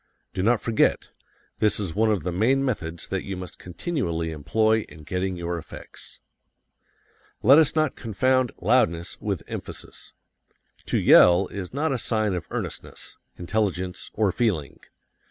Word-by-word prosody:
Do - - -2
not 115 +3 +2
forget: 115 -2 +1 0.5
this 105 -1 +2
is 95 -6 -3
one 110 +4 +2
of 100 -7 0
the 90 - -2
main 125 +10 +2
methods 85 -10 -3
that 95 -1 -2
you 95 -2 -5
must 90 0 -9
continually 85 - -3
employ 110 +10 +2
in 75 +1 -13
getting 90 +4 -2
your 85 0 -3
effects. - - -11 1.2
Let 135 +7 +8
us 160 -1 +3
not 155 -3 +1
confound 130 +3 +1
loudness 85 +1 +1
with - - -2
emphasis. - - -8 0.7
To - - +1
yell 90 +2 +6
is 95 -3 -6
not 145 +4 -1
a 125 - -2
sign 110 -3 0
of 90 -3 -4
earnestness, - - -6 0.2
intelligence, 90 -1 -2
or 105 -3 +2
feeling. 90 - -1
100 Hz, 145 wpm, -25 LUFS, 85-115 Hz, 1.2 s, Let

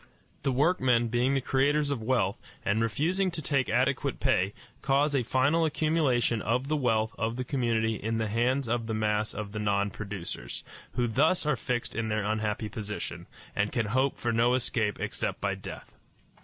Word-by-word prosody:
The 135 - +1
workmen 130 -5 +3
being 125 +4 +2
the 135 - +1
creators 145 +3 +2
of 130 -5 -2
wealth, 110 -5 0 0.2
and 105 +3 +2
refusing 165 - +1
to 170 - -3
take 140 -3 0
adequate 135 +2 +1
pay, 100 -7 +1 0.3
cause 145 +1 +2
a 135 - +3
final 130 +7 +2
accumulation 150 -7 +1
of 125 +6 0
the 155 - +2
wealth 115 -6 +1
of 115 +1 0
the 130 - -2
community 115 -4 0
in 110 +1 -2
the 110 -1 0
hands 120 +5 +1
of 115 0 -1
the 110 - -1
mass 105 0 0
of 105 -1 -5
the 105 - -4
non 100 -1 +1
producers, 100 -4 -6 0.3
who 120 - +1
thus 150 +10 +2
are 150 -2 +2
fixed 120 +1 -2
in 115 0 -1
their 110 0 0
unhappy 110 0 -1
position, 105 0 -5 0.3
and 100 +1 +1
can 115 -3 0
hope 130 +6 +1
for 120 - -1
no 120 +2 +4
escape 110 -4 -1
except - - -2
by - - 0
death. - - -8
120 Hz, 185 wpm, -29 LUFS, 110-135 Hz, 0.3 s, no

